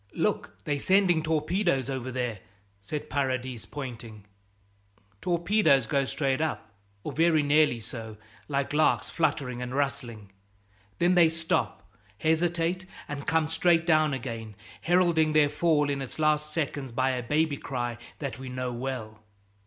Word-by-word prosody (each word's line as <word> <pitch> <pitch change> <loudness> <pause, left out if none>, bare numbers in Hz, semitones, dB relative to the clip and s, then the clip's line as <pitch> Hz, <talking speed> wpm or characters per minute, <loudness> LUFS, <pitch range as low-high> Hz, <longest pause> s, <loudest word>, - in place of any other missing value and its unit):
"Look, - - -1
they're 145 +3 -1
sending 185 -1 +3
torpedoes 160 -2 0
over 130 -2 -4
there!" 125 -5 -2 0.4
said 145 +10 -5
Paradis, 130 -3 -2
pointing. 115 -7 -8 1.0
Torpedoes 175 - +3
go 140 +4 +1
straight 135 0 -1
up, 155 -8 -3 0.3
or - - -4
very 160 -1 +3
nearly 145 -4 +3
so, 110 -1 -7 0.3
like 140 -1 -1
larks, 155 +1 +2
fluttering 135 -7 -1
and 125 +1 -4
rustling; 120 -7 -3 0.7
then 175 +1 +3
they 175 -2 +6
stop, 165 0 -1 0.3
hesitate, 170 - 0 0.2
and 140 -1 -6
come 160 -1 +2
straight 165 +1 +2
down 155 -2 +4
again, 115 -5 -5 0.3
heralding 170 -3 +3
their 150 -1 +5
fall 150 0 +2
in 140 -1 -1
its 130 - -6
last 150 -1 +1
seconds 145 -4 -3
by 130 +2 +1
a 125 -1 -2
"baby 150 +4 +1
cry" 120 -3 -4 0.2
that 135 -5 -5
we 130 -1 -7
know 125 -1 -3
well. 120 -4 -5
145 Hz, 140 wpm, -28 LUFS, 125-160 Hz, 1.0 s, they